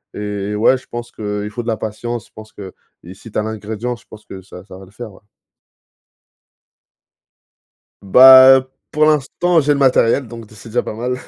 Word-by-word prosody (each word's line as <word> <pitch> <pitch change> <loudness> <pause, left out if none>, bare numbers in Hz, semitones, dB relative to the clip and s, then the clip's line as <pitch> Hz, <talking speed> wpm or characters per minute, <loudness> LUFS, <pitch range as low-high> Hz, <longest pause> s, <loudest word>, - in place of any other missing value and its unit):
et 105 0 -5
ouais 115 +5 +2
je 130 - -17
pense 120 0 -8
qu'il 105 -1 -6
faut 120 +3 -6
de - - -12
la 110 - -2
patience 110 +2 -6
je - - -36
pense 110 0 -14
qu'i 95 -2 -14
si 115 +4 -15
tu - - -3
as - - -2
l'ingrédient 110 +2 -6
je 115 - -21
pense 105 -1 -15
que 95 -2 -11
ça 90 -1 -14
ça 95 - -14
va 95 - -14
le 90 - -21
faire 110 +2 -10
ouais. - - -20 2.8
Bah, 130 +4 +7 0.2
pour 155 0 +1
l'instant 155 +3 +1
j'ai 145 +1 +1
le - - -3
matériel 130 -1 +2
donc 115 -1 -11
d 110 - -19
c'est 115 - -14
déjà 120 +2 -1
pas - - -8
mal 125 +3 -4
110 Hz, 195 wpm, -17 LUFS, 105-125 Hz, 2.8 s, Bah